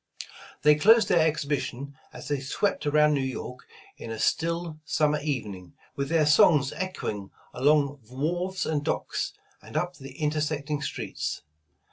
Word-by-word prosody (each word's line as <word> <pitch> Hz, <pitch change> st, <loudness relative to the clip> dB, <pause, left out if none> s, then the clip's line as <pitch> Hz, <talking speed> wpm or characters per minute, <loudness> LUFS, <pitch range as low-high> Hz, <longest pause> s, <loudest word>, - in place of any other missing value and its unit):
They 150 Hz, +1 st, +7 dB
closed 215 Hz, +7 st, +5 dB
their 175 Hz, -, +4 dB
exhibition 140 Hz, -2 st, -3 dB, 0.2 s
as -, -, -10 dB
they 145 Hz, -1 st, -1 dB
swept 150 Hz, +5 st, -1 dB
around 150 Hz, +1 st, +4 dB
New 140 Hz, -, +1 dB
York 125 Hz, -1 st, -5 dB, 0.3 s
in -, -, -8 dB
a 115 Hz, -, -4 dB
still 165 Hz, +3 st, -1 dB
summer 150 Hz, -1 st, +1 dB
even 130 Hz, -9 st, -2 dB
ing, 90 Hz, -2 st, -12 dB, 0.2 s
with 140 Hz, 0 st, -2 dB
their 160 Hz, -2 st, +3 dB
songs 145 Hz, -1 st, +5 dB
echoing 105 Hz, -, -4 dB, 0.2 s
along 145 Hz, +1 st, +2 dB
wharves 175 Hz, +8 st, -2 dB
and 150 Hz, -2 st, -1 dB
docks, -, -, -2 dB, 0.3 s
and -, -, -6 dB
up 180 Hz, 0 st, -2 dB
the 135 Hz, -1 st, -11 dB
intersecting 150 Hz, -1 st, -1 dB
streets. 135 Hz, -, -4 dB
150 Hz, 145 wpm, -27 LUFS, 135-160 Hz, 0.3 s, They